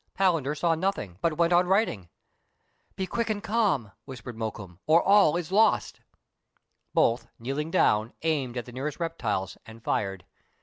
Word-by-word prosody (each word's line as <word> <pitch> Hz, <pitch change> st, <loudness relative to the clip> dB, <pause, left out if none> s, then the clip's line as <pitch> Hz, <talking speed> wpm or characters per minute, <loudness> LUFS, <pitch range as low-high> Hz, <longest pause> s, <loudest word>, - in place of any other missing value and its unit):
Palan 180 Hz, -6 st, +3 dB
der 145 Hz, +2 st, -1 dB
saw 165 Hz, +2 st, +1 dB
nothing, 160 Hz, -, -2 dB
but 165 Hz, -2 st, 0 dB
went 170 Hz, 0 st, +3 dB
on 175 Hz, +1 st, +4 dB
writing. 180 Hz, -, +1 dB, 0.4 s
" -, -, -43 dB
Be 190 Hz, -, -2 dB
quick 230 Hz, +4 st, -2 dB
and 210 Hz, -1 st, -2 dB
calm," 205 Hz, -, +1 dB
whispered 125 Hz, -3 st, -8 dB
Mokoum, 105 Hz, -6 st, -6 dB
" -, -, -54 dB
or 160 Hz, +2 st, +6 dB
all 195 Hz, -5 st, +5 dB
is 175 Hz, -1 st, -5 dB
lost." 215 Hz, +2 st, +2 dB, 0.9 s
Both, 115 Hz, 0 st, +2 dB
kneeling 135 Hz, +6 st, -3 dB
down, 110 Hz, -10 st, +2 dB
aimed 140 Hz, -6 st, -1 dB
at 120 Hz, -, -3 dB
the 125 Hz, -, -11 dB
nearest 140 Hz, +6 st, -4 dB
reptiles, 115 Hz, -, -3 dB
and 115 Hz, 0 st, -13 dB
fired. 95 Hz, -4 st, -2 dB
150 Hz, 170 wpm, -27 LUFS, 115-180 Hz, 0.9 s, or